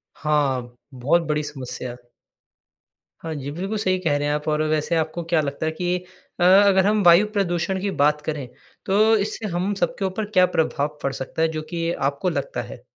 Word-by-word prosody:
हाँ, 135 Hz, -5 st, 0 dB, 0.2 s
बहुत 140 Hz, +7 st, +2 dB
बड़ी 150 Hz, 0 st, 0 dB
समस्या। 130 Hz, -3 st, -6 dB, 1.3 s
हाँ 160 Hz, -, -5 dB
जी, 140 Hz, 0 st, -5 dB
बिल्कुल 195 Hz, +7 st, -3 dB
सही 185 Hz, -3 st, +1 dB
कह 155 Hz, -5 st, +1 dB
रहे 145 Hz, 0 st, -1 dB
हैं 145 Hz, -, +1 dB
आप। 150 Hz, +1 st, -3 dB
और 155 Hz, 0 st, +1 dB
वैसे 155 Hz, +2 st, 0 dB
आपको 160 Hz, +1 st, -1 dB
क्या 160 Hz, -2 st, +4 dB
लगता 140 Hz, +2 st, -3 dB
है 160 Hz, -, 0 dB
कि 175 Hz, +2 st, -1 dB, 0.4 s
अ, 175 Hz, -, +2 dB
अगर 190 Hz, +1 st, +6 dB
हम 210 Hz, 0 st, +3 dB
वायु 175 Hz, +4 st, +7 dB
प्रदूषण 190 Hz, -1 st, -1 dB
की 205 Hz, -, -1 dB
बात 150 Hz, 0 st, +3 dB
करें 150 Hz, -4 st, -3 dB, 0.4 s
तो 215 Hz, +3 st, +4 dB
इससे 210 Hz, +1 st, -2 dB
हम 190 Hz, +4 st, 0 dB
सबके 195 Hz, +1 st, -1 dB
ऊपर 190 Hz, +3 st, -2 dB
क्या 185 Hz, -3 st, +5 dB
प्रभाव 150 Hz, -1 st, 0 dB
पड़ 135 Hz, -, 0 dB
सकता 135 Hz, +5 st, -5 dB
है 165 Hz, -, +4 dB
जो -, -, -2 dB
कि 170 Hz, 0 st, -1 dB
आपको 140 Hz, +7 st, -1 dB
लगता -, -, -3 dB
है? -, -, -11 dB
165 Hz, 195 wpm, -23 LUFS, 150-190 Hz, 1.3 s, वायु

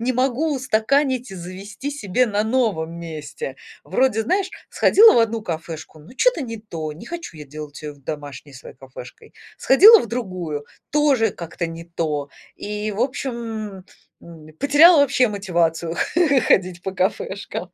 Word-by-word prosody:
не 250 Hz, +2 st, 0 dB
могу 270 Hz, +5 st, 0 dB
устаканить 255 Hz, 0 st, 0 dB
и -, -, -7 dB
завести 195 Hz, +9 st, -7 dB
себе 250 Hz, -2 st, 0 dB
на 210 Hz, 0 st, 0 dB
новом 220 Hz, -10 st, 0 dB
месте. 170 Hz, -, -7 dB, 0.3 s
Вроде, 255 Hz, -4 st, +1 dB
знаешь, 380 Hz, -, 0 dB, 0.2 s
сходила 440 Hz, +2 st, +6 dB
в -, -, +4 dB
одну 230 Hz, -1 st, +1 dB
кафешку, 160 Hz, -2 st, -6 dB
ну, 155 Hz, +10 st, -15 dB
чё-то -, -, +2 dB
не 230 Hz, -4 st, -5 dB
то, 160 Hz, -8 st, -6 dB
не 170 Hz, +10 st, -12 dB
хочу 340 Hz, -, -7 dB
я 150 Hz, -, -9 dB
делать 150 Hz, +1 st, -9 dB
её 150 Hz, -1 st, -6 dB
домашней 145 Hz, 0 st, -8 dB
своей 125 Hz, -, -12 dB
кафешкой. 130 Hz, -2 st, -13 dB, 0.2 s
Сходила 420 Hz, +12 st, +8 dB
в -, -, -4 dB
другую- 185 Hz, -10 st, -4 dB, 0.3 s
тоже 280 Hz, -8 st, +3 dB
как-то 170 Hz, -1 st, -5 dB
не 165 Hz, 0 st, -8 dB
то. 155 Hz, -4 st, -3 dB, 0.3 s
И, 210 Hz, +1 st, -4 dB
в 205 Hz, -, -5 dB
общем, 225 Hz, -6 st, -4 dB, 0.4 s
м, 160 Hz, -2 st, -13 dB
потеряла 295 Hz, +3 st, +7 dB
вообще 270 Hz, -2 st, +3 dB
мотивацию 170 Hz, -5 st, -1 dB, 0.5 s
ходить 180 Hz, -2 st, +2 dB
по 190 Hz, -, -4 dB
кафешкам. 185 Hz, -1 st, -3 dB
205 Hz, 150 wpm, -21 LUFS, 165-255 Hz, 0.5 s, Сходила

